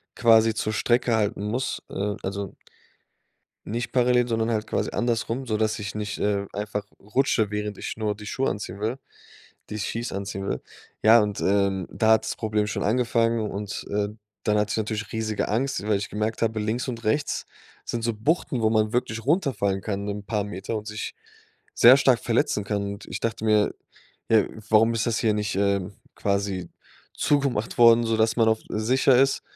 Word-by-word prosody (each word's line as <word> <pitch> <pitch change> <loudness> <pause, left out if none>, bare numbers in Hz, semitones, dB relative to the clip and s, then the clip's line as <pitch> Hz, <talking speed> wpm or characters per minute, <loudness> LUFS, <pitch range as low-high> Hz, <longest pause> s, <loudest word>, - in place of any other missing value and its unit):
quasi 115 -1 +5
zur 110 0 -1
Strecke 120 +2 +2
halten 105 -1 0
muss, 125 +5 -2
äh, 100 +1 -2
also 100 0 -4 1.1
nicht 120 +2 -3
parallel, 125 -1 +3
sondern 115 0 0
halt 110 -1 -1
quasi - - -1
andersrum, 120 +2 -1
sodass 110 -1 0
ich 100 -3 -5
nicht, 105 -1 -4
äh, 100 -1 0
einfach 105 0 -3 0.2
rutsche, 110 -1 +1
während 105 -1 -3
ich - - -5
nur 105 -2 -1
die 105 0 -11
Schuhe 135 +5 -1
anziehen 100 -1 -5
will, 110 +5 -2 0.7
die 105 - -4
Skis 115 +3 -3
anziehen 95 0 -4
will. 65 - -2 0.4
Ja, 115 +1 +7
und, 105 -1 -3
ähm, 100 -2 +1
da 110 -1 +2
hat 110 - +5
das - - -3
Problem 105 -1 -1
schon - - -2
angefangen 115 -1 +1
und, 100 0 -5
äh, 105 0 0 0.3
dann 105 -1 +2
hatte 105 0 0
ich - - -1
natürlich 110 -1 -3
riesige 110 -1 -2
Angst, 120 -1 0
weil 105 -2 +3
ich 100 - -5
gemerkt 110 +2 -2
habe, 110 -1 0
links 110 +5 -2
und 115 -2 -5
rechts 140 +7 -1 0.4
sind 115 -1 -4
so 115 0 0
Buchten, 125 +2 0
wo 110 - +3
man 110 0 +1
wirklich 115 -2 -1
runterfallen 120 - +1
kann 100 0 -3
'nen 105 0 -4
paar 105 +1 -1
Meter 100 +2 -4
und 105 - -7
sich 105 0 -5 0.6
sehr 125 +3 +8
stark 130 -3 +4
verletzen 120 -2 0
kann. 100 0 -1
Und 100 - -11
ich - - -5
dachte 115 -1 -2
mir: 105 -1 +3 0.6
„Ja, 110 -2 +5 0.2
warum 115 +1 +5
ist 115 0 -1
das 115 - +1
hier 110 -2 +2
nicht, 105 -2 -2
ähm, 100 -1 0 0.2
quasi 100 -3 -1 0.5
zugemacht 135 -7 0
worden, 115 0 +7
sodass 110 0 +2
man 115 -2 +3
auch 110 0 +2
sicher 125 +4 +3
ist?“ 135 0 +3
110 Hz, 185 wpm, -25 LUFS, 105-115 Hz, 1.1 s, sehr